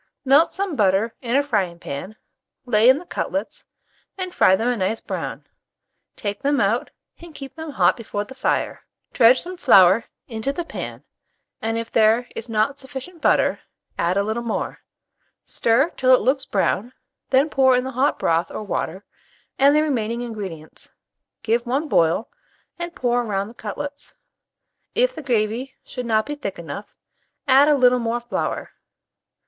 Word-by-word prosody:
Melt 280 +5 +5
some 385 -4 -3
butter 205 +1 +2
in 240 0 -1
a 285 - +4
frying 195 -11 -1
pan, 170 +6 -7 0.5
lay 230 -1 +4
in 260 - +6
the 350 - -9
cutlets, - - -4 0.5
and 370 -1 -4
fry 185 - +5
them 225 +5 -1
a 245 - +2
nice 205 +1 -1
brown; - - -5 0.7
take 205 -1 -4
them, 285 0 +1
out, 215 +4 +1 0.3
and 335 -2 -13
keep 275 -1 -8
them 320 -1 -7
hot 285 - +2
before 210 -3 -4
the 265 - -11
fire. 260 - -1 0.3
Dredge 245 +1 +6
some 360 +1 -7
flour 200 - +6 0.2
into 225 +2 -3
the 345 +5 -4
pan, - - -7 0.6
and 225 0 -1
if 230 0 -5
there 225 +2 +3
is 230 - -6
not 225 +6 0
sufficient 270 +6 -9
butter, - - +3 0.4
add 175 +3 0
a 200 - +2
little 220 +3 -2
more; 235 -2 -3 0.6
stir 250 +8 +1
till 255 0 +4
it - - 0
looks 265 +1 +1
brown, 210 +4 0 0.4
then 270 +3 +4
pour 265 -4 +4
in 250 - 0
the 265 - -4
hot 260 +3 +1
broth 165 +1 +1
or - - -6
water, 195 -1 -4 0.5
and 280 +2 +6
the 305 - +4
remaining 235 -5 -1
ingredients; 195 -10 -7 0.5
give 230 +2 0
one 275 +6 0
boil, 170 - +2 0.5
and 345 0 -5
pour 245 -1 +1
round 200 -1 -2
the - - -15
cutlets. 280 +6 -7 0.8
If - - +2
the - - -7
gravy 240 0 -1
should 250 -1 -6
not 220 -1 +2
be 295 - -4
thick 275 -10 -5
enough, 170 +5 -8 0.5
add 275 +2 +6
a 300 - +5
little 250 -2 +4
more 235 0 -1
flour. 240 0 -3
240 Hz, 165 wpm, -22 LUFS, 215-275 Hz, 0.8 s, in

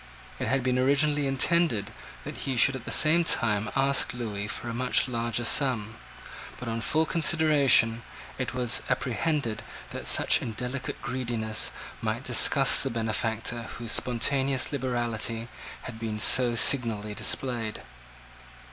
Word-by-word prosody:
It - - -3
had 135 +2 0
been 125 0 0
originally 145 +2 +1
intended 135 - 0 0.3
that - - -8
he 130 -2 -4
should 135 +3 +5
at 130 -2 -9
the - - -6
same 165 +3 +4
time 105 -8 +1
ask 135 -1 +1
Lewis 105 -3 -5
for - - -6
a 115 - -4
much 125 +2 +1
larger 120 -1 -3
sum; 115 -6 0 0.7
but, 125 - -8
on 115 0 -3
full 160 +8 0
consideration, 150 -8 +3 0.4
it 125 - -3
was 125 -2 0
apprehended 125 -3 -2 0.3
that - - -6
such - - +3
indelicate 125 +3 -6
greediness 120 -4 -2 0.3
might 115 +3 -3
disgust 135 +2 +6
the 135 - -1
benefactor 115 0 -3
whose 115 -3 -6
spontaneous 130 +2 +1
liberality 120 -3 -3 0.3
had 115 -3 -9
been 110 -2 -4
so 120 +2 +2
signally 115 -4 +1
displayed. 115 -1 -2
120 Hz, 135 wpm, -26 LUFS, 115-135 Hz, 0.7 s, disgust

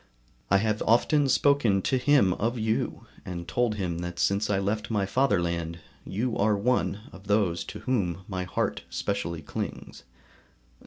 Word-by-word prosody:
I 100 - +5
have 105 +1 0
often 135 +5 +4
spoken 125 -8 +3
to 130 - +1
him 125 -8 +4
of 115 +6 -1
you, 110 0 -1 0.2
and 85 -1 -6
told 115 +6 +1
him 90 -5 -2
that 85 0 -5
since 100 +3 +1
I 100 - +2
left 100 +3 -1
my 105 -3 +1
fatherland, 85 -8 0 0.3
you 115 +5 -1
are 105 -1 +3
one 105 -1 0
of 95 +1 -13
those 95 -5 +1
to - - -8
whom 95 -8 -1
my 95 -2 -3
heart 90 - -2
specially 85 -2 -3
clings. - - -6
100 Hz, 155 wpm, -27 LUFS, 90-115 Hz, 0.3 s, I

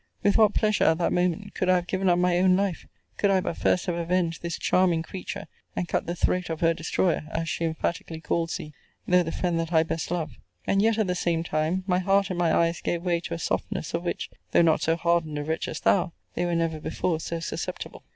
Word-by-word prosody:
With 205 - +3
what 215 -2 +5
pleasure, 215 -1 +2
at 160 - +4
that 170 - +1
moment, 180 +3 0
could 185 - -1
I 185 - +6
have 175 -1 0
given 190 +1 0
up 175 - +4
my 180 0 +2
own 185 0 +5
life, 195 -3 -1 0.3
could 200 - +2
I 195 -1 +4
but 175 - -3
first 180 - +1
have 180 - -1
avenged 170 0 0
this 170 -1 -3
charming 175 -3 +2
creature, 185 +2 -6 0.3
and 180 - -2
cut - - -1
the 175 - -2
throat 180 +1 0
of 160 -1 -4
her 165 0 +4
destroyer, 165 0 0
as 165 0 -2
she 165 - -1
emphatically 160 0 -3
calls 165 0 -1
thee, 150 - -9 0.3
though 180 0 +5
the 165 -2 -3
friend 175 -2 -1
that 165 0 -3
I 160 -2 +5
best 165 0 -3
love: 160 -8 -3 0.3
and 195 - +2
yet, 225 +1 +3
at 220 - +2
the 180 - 0
same 170 -2 0
time, 160 +4 -1
my 180 -2 +2
heart 195 +1 +2
and 175 - -3
my 170 -2 +3
eyes 170 +1 +2
gave 170 0 -2
way 175 -2 +1
to 170 0 -5
a - - -5
softness 165 - -2
of 170 - 0
which 175 - -3 0.2
(though - - +6
not 160 -2 +3
so 165 - +2
hardened 170 -3 0
a 145 - -2
wretch 160 +2 -2
as - - -4
thou) 180 -3 +2 0.2
they 175 - -1
were 175 -1 0
never 165 -2 0
before 165 +1 -1
so 165 +1 -4
susceptible. 165 - -5
170 Hz, 245 wpm, -26 LUFS, 165-185 Hz, 0.3 s, I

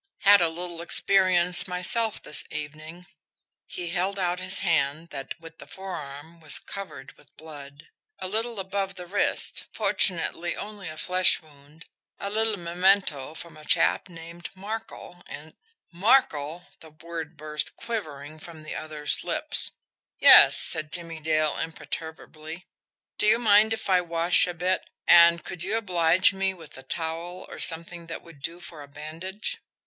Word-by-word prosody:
"Had 200 -1 +7
a 170 - +3
little 170 0 -5
experience 180 0 +4
myself 205 +5 0
this 150 - +1
evening." 155 +3 -8 0.6
He 175 -1 -5
held 185 +3 -1
out 180 -1 -1
his 185 +1 +2
hand 165 -2 0
that, 135 +3 -7
with 165 -1 -13
the - - -11
forearm, 165 -4 -8
was 155 -2 +6
covered 145 -9 -8
with 150 - -24
blood. 145 -1 -12 0.3
"A 185 - -5
little 225 +2 -2
above 195 0 -3
the 180 - -8
wrist 200 +3 0
fortunately 175 -1 0
only 205 -4 -7
a 155 - -9
flesh 185 +2 +3
wound 150 +1 -19 0.3
a 200 - -5
little 220 0 0
memento 175 -4 +1
from 165 0 -10
a 155 - -14
chap 170 - +2
named 170 0 -10
Markel, 200 -3 -7
and 155 +2 -10 0.2
" 455 - -43
"MARKEL!" 175 - +2
The 160 - -14
word 160 0 -8
burst, 150 0 -3
quivering, 155 -10 -6
from 160 0 -11
the 155 - -6
other's 155 -1 -2
lips. - - -2 0.5
"Yes," - - +8
said 155 -1 -1
Jimmie 165 -2 -4
Dale 155 -1 0
imperturbably. 160 +1 -7 0.5
"Do - - +5
you 220 +2 +6
mind 215 -2 +5
if 225 0 -3
I 185 -2 +4
wash 170 +1 +3
a 175 - -4
bit 180 +2 -1 0.2
and 170 0 +7
could 175 -1 -3
you 205 +4 0
oblige 180 -3 +3
me 195 0 -1
with 165 -4 -14
a 130 - -9
towel, 165 +5 -5
or - - -10
something 170 +1 -2
that 165 - -7
would 165 -5 -16
do 170 +5 -6
for 165 -3 -9
a 145 - -11
bandage?" 160 +8 -6
170 Hz, 155 wpm, -26 LUFS, 155-185 Hz, 0.6 s, Yes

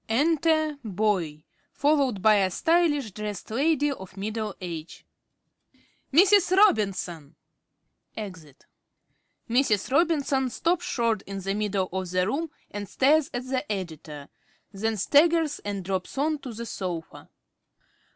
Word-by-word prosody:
Enter 310 +3 +2
Boy, 185 -7 -1 0.3
followed 275 -9 +1
by 215 -1 +6
a 190 -2 +2
stylishly 295 - +1
dressed 210 0 -6
lady 290 +4 +2
of 190 -7 -9
middle 215 +1 -3
age. 170 -3 -7 1.1
~Boy.~ 305 +6 +7
Mrs. 385 -2 +4
Robinson. 185 - +2 0.8
(Exit.) 170 -10 -9 0.8
(Mrs. 235 -3 +1
Robinson 285 -3 +2
_stops 335 +8 0
short 230 - 0
in 195 0 -5
the 195 +1 -2
middle 200 -2 -1
of 190 -1 -3
the 180 0 +1
room 305 - -2 0.2
and 205 -1 -6
stares 290 +2 +3
at 245 +1 -4
the 260 0 -1
Editor; 160 -6 -6 0.4
then 215 +2 -2
staggers 305 - +3
and 200 -3 -5
drops 190 +5 -3
on 300 +2 0
to 265 -3 -7
the 230 +1 -6
sofa. 180 -6 -6
220 Hz, 125 wpm, -26 LUFS, 190-290 Hz, 1.1 s, ~Boy.~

